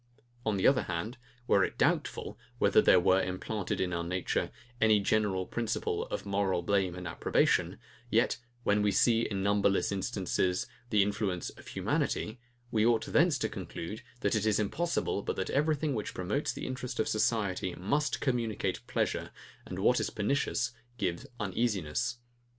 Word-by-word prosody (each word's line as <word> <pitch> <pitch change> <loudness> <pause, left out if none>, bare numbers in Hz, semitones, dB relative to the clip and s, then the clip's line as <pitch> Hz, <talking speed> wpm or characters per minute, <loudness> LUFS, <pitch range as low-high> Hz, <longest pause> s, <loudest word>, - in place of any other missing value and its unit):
On 105 -2 +2
the 95 - 0
other 135 - +5
hand, 105 +9 -4 0.3
were 100 -5 +4
it - - -2
doubtful, - - 0 0.2
whether - - +5
there 90 - +6
were, 95 +2 +4
implanted 95 +2 -3
in 90 -1 0
our 85 0 -1
nature, 90 +2 -1 0.3
any 110 -2 +5
general 100 -2 +1
principle 115 +1 -2
of - - -4
moral 100 -3 0
blame 95 -1 +1
and 90 0 -6
approbation, 80 - +1 0.3
yet 115 +1 +2 0.2
when 105 -1 +3
we 105 0 +3
see, 115 +3 +4
in 100 -4 -2
numberless 100 -1 +2
instances, 95 -2 0 0.2
the 105 -3 +4
influence 100 -3 -2
of - - -15
humanity, 110 +3 -1 0.3
we 110 -1 +2
ought 115 -1 +3
thence - - +3
to - - 0
conclude, 105 +6 -6 0.2
that - - +1
it 110 -1 +1
is 105 -1 +3
impossible, 130 - 0
but - - -3
that 95 - -2
everything 150 0 +1
which 105 -4 -4
promotes 105 - -1
the - - -6
interest 130 -1 -4
of 110 - +2
society 100 -5 0
must 140 +9 0
communicate 115 - -1
pleasure, - - -1 0.4
and - - -6
what - - +3
is - - -1
pernicious 120 +2 0 0.3
give 95 +6 -2
uneasiness. 100 -1 -1
105 Hz, 160 wpm, -31 LUFS, 95-115 Hz, 0.4 s, there